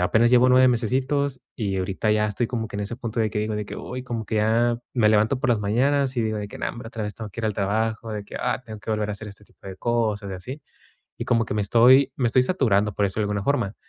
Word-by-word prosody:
apenas 110 +6 +3
llevo 125 0 +6
9 130 0 +6
mesecitos 130 +3 0 0.2
y 100 -4 -2
ahorita 95 +3 -1
ya 105 0 +2
estoy 110 +4 -1
como 115 -1 -3
que - - -7
en - - -3
ese 105 +3 -4
punto 115 -2 -3
de 110 - +2
que 105 - -2
digo, 110 0 -2
de 105 - -3
que: - - -8
"Uy", 125 +1 -6
como 115 -3 -4
que 110 - -2
ya 115 +2 +2 0.2
me 115 -4 +4
levanto 110 +4 +3
por 130 - +1
las 115 -3 +2
mañanas 130 +6 +1
y 120 - +1
digo 110 -1 -1
de 105 -1 -5
que: - - -10
"No - - -2
hombre 120 -1 -8
otra 115 -1 -6
vez 105 - -5
tengo 110 -2 -7
que 115 - -7
ir - - -4
al 105 - -1
trabajo, 110 +3 -1
de 105 -1 -5
que: - - -9
"Ah, 125 0 -1
tengo 110 -3 -9
que 110 - -6
volver 105 -1 -1
a - - -2
hacer 105 +1 -6
este 100 +1 -12
tipo - - -19
de 95 -1 -7
cosas" 110 -3 -1
y - - -4
así. 130 +11 -8 0.6
Y 120 - -4
como 115 -2 +2
que - - -4
me 105 - 0
estoy 125 +6 +5
me 125 - +2
estoy 125 +2 +3
saturando, 110 - +1
por 100 - +1
eso 100 +2 -3
de - - +2
alguna 100 -1 -2
forma. 115 -6 0
110 Hz, 290 wpm, -24 LUFS, 105-125 Hz, 0.6 s, llevo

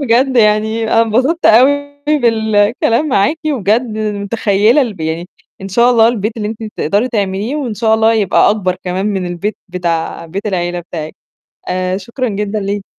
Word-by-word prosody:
بجد 260 0 +2
يعني 220 0 +2
أنا 225 +1 +3
أتبسطت 260 +10 +1
أوي 285 +4 +3
بالكلام 230 0 +2
معاكِ، 275 +6 +1
وبجد 220 -2 +1 0.2
متخيّلة 210 +3 +1
الب 215 -9 -5
يعني 160 +2 -3 0.3
إن 195 - -6
شاء 235 +6 +3
الله 230 -2 +5
البيت 220 -1 -2
اللي 210 -2 -3
أنتِ 220 -1 -7
تقدري 210 +5 0
تعمليه 205 +3 -2
وإن 255 -7 -3
شاء 220 +1 +2
الله 220 0 +3
يبقى 205 -3 +3
أكبر 185 -4 -1
كمان 185 +2 -2
من 195 -3 -2
البيت 175 +5 -3
بتاع 170 -2 -3
بيت 195 +6 -5
العيلة 175 -3 -2
بتاعِك، 160 -2 -7 0.5
آآ 185 0 -1
شكرًا 235 +6 -4
جدًا 210 0 -3
ليكِ. 200 0 -3
215 Hz, 160 wpm, -15 LUFS, 195-235 Hz, 0.5 s, الله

